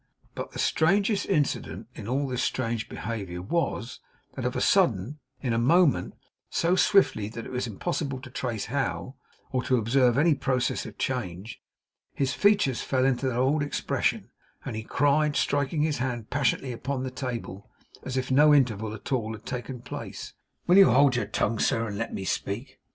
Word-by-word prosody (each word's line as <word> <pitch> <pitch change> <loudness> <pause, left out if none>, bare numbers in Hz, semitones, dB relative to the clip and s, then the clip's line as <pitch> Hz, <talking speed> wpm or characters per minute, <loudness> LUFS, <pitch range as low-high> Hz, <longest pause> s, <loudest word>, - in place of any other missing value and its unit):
But - - -5
the - - -9
strangest 195 +6 +2
incident 130 - -1
in 110 -4 -8
all 135 +3 0
this 125 -1 -2
strange 115 -3 -2
behaviour 100 -6 -5
was, 120 - -2 0.3
that - - -5
of - - -1
a - - 0
sudden, 115 +12 +2 0.2
in 120 -3 0
a 115 - +1
moment, 165 +5 +3 0.3
so 170 +2 +2
swiftly 185 - +3
that 115 +1 -7
it - - -8
was 125 -1 -2
impossible 135 - -3
to 130 -2 -11
trace 120 -5 -3
how, 135 0 -2 0.4
or 130 -2 0
to 130 0 +1
observe 120 +2 +3
any 160 +3 +5
process 130 -4 -1
of 105 - -11
change, 105 -5 -4 0.5
his 135 -2 0
features 200 - +3
fell 130 -1 +1
into 135 0 +1
their 125 -2 -1
old 135 +4 +2
expression, 145 - -1 0.3
and - - -4
he 110 - -3
cried, 145 +5 +2
striking 145 +2 +1
his 155 -4 0
hand 120 -4 -3
passionately 135 -1 0
upon 130 +2 -3
the 130 - -4
table 120 -6 -6 0.3
as 130 0 -4
if 130 0 -2
no 150 +3 +6
interval 110 -5 +1
at 110 - -10
all 110 -4 0
had 110 0 -11
taken 125 0 -5
place: - - -7 0.3
'Will 180 +2 +5
you 195 - +8
hold 140 -3 +5
your 120 -4 -1
tongue, 110 +1 -1
sir, 115 0 +1
and 100 -1 -5
let 115 - -3
me 95 - -5
speak? 105 +8 -3
130 Hz, 180 wpm, -27 LUFS, 115-145 Hz, 0.5 s, you